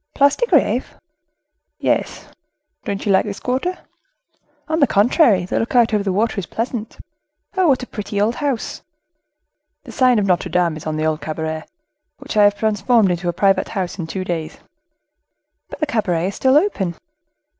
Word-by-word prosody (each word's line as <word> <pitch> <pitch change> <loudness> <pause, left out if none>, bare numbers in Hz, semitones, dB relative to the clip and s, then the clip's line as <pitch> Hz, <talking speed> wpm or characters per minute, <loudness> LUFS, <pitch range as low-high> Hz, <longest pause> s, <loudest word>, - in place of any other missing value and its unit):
"Place 280 0 +4
de 485 - -1
Greve?" - - +1 0.8
"Yes; - - -1 0.6
don't 200 -1 -3
you 205 - +2
like 190 - +4
this 205 -1 -5
quarter?" 265 +9 -2 0.9
"On 320 0 0
the 280 - +5
contrary, 210 - +3
the - - -1
look 230 +3 -3
out 235 -2 +4
over 210 -1 +1
the 195 - -1
water 210 +2 0
is 190 - -6
pleasant. 230 -1 -4 0.6
Oh! 375 -2 +3
what 265 -3 +2
a - - -4
pretty 210 -3 -5
old 215 +3 +2
house!" 280 -6 -3 1.0
"The - - -11
sign 255 -2 +3
Notre 180 -2 +1
Dame; 175 -2 +1
it - - -7
is 155 - -8
an 155 0 -2
old 155 0 0
cabaret, 160 0 -4 0.5
which 275 -2 -8
I 210 -1 +6
have 205 0 +3
transformed 220 -1 +2
into 175 0 -2
a - - -1
private 195 +2 +2
house 190 -2 -4
in 165 - -4
two 185 +3 -4
days." 170 -4 -4 1.1
"But - - -9
the 305 - +1
cabaret 190 - 0
is 200 - -8
still 265 +2 +4
open?" 200 - 0
205 Hz, 175 wpm, -19 LUFS, 180-250 Hz, 1.1 s, I